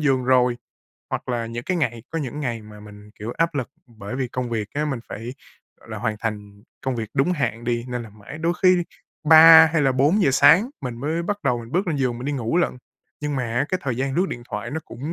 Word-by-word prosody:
giường 135 Hz, -4 st, +1 dB
rồi. 125 Hz, -1 st, +3 dB, 0.5 s
Hoặc -, -, -4 dB
là 120 Hz, -2 st, -1 dB
những 120 Hz, +1 st, -6 dB
cái 185 Hz, -, -1 dB
ngày 120 Hz, -8 st, -1 dB
có 165 Hz, -, -2 dB
những 145 Hz, 0 st, -5 dB
ngày 120 Hz, -5 st, -3 dB
mà 105 Hz, 0 st, -13 dB
mình, 105 Hz, 0 st, -13 dB
kiểu, 110 Hz, +3 st, -5 dB
áp 165 Hz, -1 st, +1 dB
lực 130 Hz, -4 st, -2 dB, 0.2 s
bởi 110 Hz, -1 st, -8 dB
vì 130 Hz, -2 st, -2 dB
công 125 Hz, -1 st, -4 dB
việc 110 Hz, -3 st, -2 dB
á, 150 Hz, +1 st, 0 dB
mình 135 Hz, -5 st, -3 dB
phải, 120 Hz, +4 st, -7 dB, 0.5 s
gọi -, -, -19 dB
là, 110 Hz, -1 st, -6 dB
hoàn 110 Hz, -1 st, -2 dB
thành 105 Hz, -2 st, -5 dB, 0.2 s
công 130 Hz, -2 st, -2 dB
việc 110 Hz, -2 st, -4 dB
đúng 140 Hz, +6 st, +2 dB
hạn 125 Hz, -8 st, -2 dB
đi, 120 Hz, 0 st, -1 dB
nên 125 Hz, -1 st, -3 dB
là 115 Hz, -, -10 dB
mãi 105 Hz, +8 st, -11 dB
đôi 165 Hz, +1 st, +1 dB
khi 185 Hz, 0 st, +6 dB
đi 175 Hz, -, 0 dB, 0.5 s
3 160 Hz, 0 st, +10 dB
hay 165 Hz, -3 st, +2 dB
là 135 Hz, -1 st, +3 dB
4:00 145 Hz, +7 st, +3 dB
sáng 160 Hz, -, +5 dB
mình 125 Hz, -4 st, -5 dB
mới 160 Hz, +5 st, -1 dB
bắt 205 Hz, +3 st, -3 dB
đầu 120 Hz, -, +1 dB
mình 115 Hz, +1 st, -10 dB
bước 185 Hz, +3 st, +1 dB
lên 165 Hz, -4 st, -1 dB
giường 125 Hz, -3 st, -1 dB
mình 125 Hz, -, -7 dB
đi 145 Hz, -, -1 dB
ngủ 125 Hz, +2 st, -1 dB
lận. 175 Hz, -7 st, 0 dB, 0.4 s
Nhưng 150 Hz, -1 st, -2 dB
mà 130 Hz, -, -1 dB
á, 120 Hz, +3 st, 0 dB
cái 185 Hz, -, -1 dB
thời 130 Hz, -4 st, -2 dB
gian 135 Hz, +1 st, -2 dB
lướt 180 Hz, +5 st, +2 dB
điện 120 Hz, -, -6 dB
thoại 120 Hz, -, -4 dB
nó 160 Hz, +3 st, -3 dB
cũng 145 Hz, +7 st, -6 dB
130 Hz, 260 wpm, -23 LUFS, 115-150 Hz, 0.5 s, 3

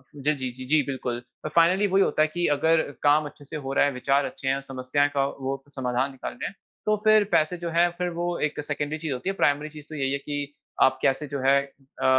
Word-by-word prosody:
ज़ 145 Hz, +1 st, +1 dB
जी, 130 Hz, -1 st, -3 dB
जी, 130 Hz, +1 st, -9 dB
जी, 150 Hz, +3 st, +4 dB
बिल्कुल, 125 Hz, -3 st, -3 dB, 0.2 s
अ, -, -, 0 dB
फाइनली 180 Hz, +5 st, +5 dB
वही 195 Hz, 0 st, +4 dB
होता -, -, +1 dB
है 155 Hz, -, +5 dB
कि 175 Hz, +1 st, 0 dB
अगर 160 Hz, +2 st, +3 dB, 0.2 s
काम 150 Hz, +1 st, +4 dB
अच्छे 145 Hz, 0 st, -11 dB
से 150 Hz, -, -8 dB
हो 135 Hz, -, -2 dB
रहा 140 Hz, -, +4 dB
है 145 Hz, -, +1 dB
विचार 135 Hz, +2 st, +1 dB
अच्छे 135 Hz, -, -6 dB
है 135 Hz, +1 st, +1 dB
समस्याएँ 135 Hz, +3 st, +1 dB
का 135 Hz, -1 st, +3 dB
वो 135 Hz, -1 st, -4 dB
समाधान 130 Hz, +1 st, 0 dB
निकाल 135 Hz, -, -6 dB
रहे -, -, -4 dB
हैं, -, -, -9 dB, 0.3 s
तो 215 Hz, -, +3 dB
फिर 215 Hz, -1 st, +6 dB
पैसे 155 Hz, +3 st, +2 dB
जो 170 Hz, 0 st, -4 dB
है 170 Hz, +1 st, +3 dB
फिर 180 Hz, 0 st, -1 dB
वो 175 Hz, 0 st, -1 dB
एक 150 Hz, -, -6 dB
सेकेंडरी 145 Hz, +1 st, -2 dB
चीज़ 155 Hz, -3 st, -3 dB
होती 130 Hz, +9 st, -3 dB
है 195 Hz, -, -2 dB
प्राइमरी 145 Hz, -3 st, +1 dB
चीज़ 150 Hz, -1 st, -12 dB
तो 155 Hz, -, -7 dB
यही 135 Hz, -2 st, 0 dB
है -, -, +1 dB
कि, 145 Hz, 0 st, -5 dB, 0.3 s
आप 130 Hz, 0 st, +5 dB
कैसे 135 Hz, +3 st, +1 dB
जो 140 Hz, 0 st, -4 dB
है 135 Hz, +1 st, +5 dB, 0.4 s
अ -, -, +2 dB
145 Hz, 250 wpm, -26 LUFS, 135-160 Hz, 0.4 s, फिर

